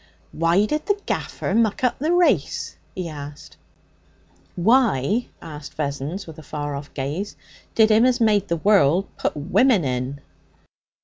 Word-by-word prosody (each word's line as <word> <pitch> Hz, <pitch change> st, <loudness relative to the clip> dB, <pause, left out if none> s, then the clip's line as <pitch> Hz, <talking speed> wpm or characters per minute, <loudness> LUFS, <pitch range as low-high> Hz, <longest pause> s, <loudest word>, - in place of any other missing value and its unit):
'Why 170 Hz, +5 st, +2 dB
did 300 Hz, +6 st, -2 dB
the 410 Hz, -1 st, +1 dB
gaffer -, -, -3 dB
muck 225 Hz, +1 st, +1 dB
up 250 Hz, -, +1 dB
the 310 Hz, +5 st, 0 dB
race?' 355 Hz, 0 st, +1 dB, 0.2 s
he 185 Hz, -2 st, -3 dB
asked. 150 Hz, 0 st, -9 dB, 1.0 s
'Why,' 220 Hz, -, +2 dB, 0.2 s
asked 150 Hz, -2 st, -9 dB
Vessons, 150 Hz, +6 st, -3 dB
with 160 Hz, -1 st, -11 dB
a -, -, -9 dB
far 145 Hz, -1 st, -5 dB
off 140 Hz, +1 st, -8 dB
gaze, 150 Hz, +9 st, -3 dB, 0.4 s
'did 220 Hz, -1 st, +5 dB
'Im 220 Hz, +3 st, +5 dB
as 250 Hz, 0 st, +1 dB
made 210 Hz, -3 st, +3 dB
the 170 Hz, -, 0 dB
'orld 195 Hz, -3 st, +4 dB
put -, -, -2 dB
women 190 Hz, -, +3 dB
in?' 130 Hz, +2 st, -2 dB
180 Hz, 145 wpm, -22 LUFS, 145-225 Hz, 1.0 s, did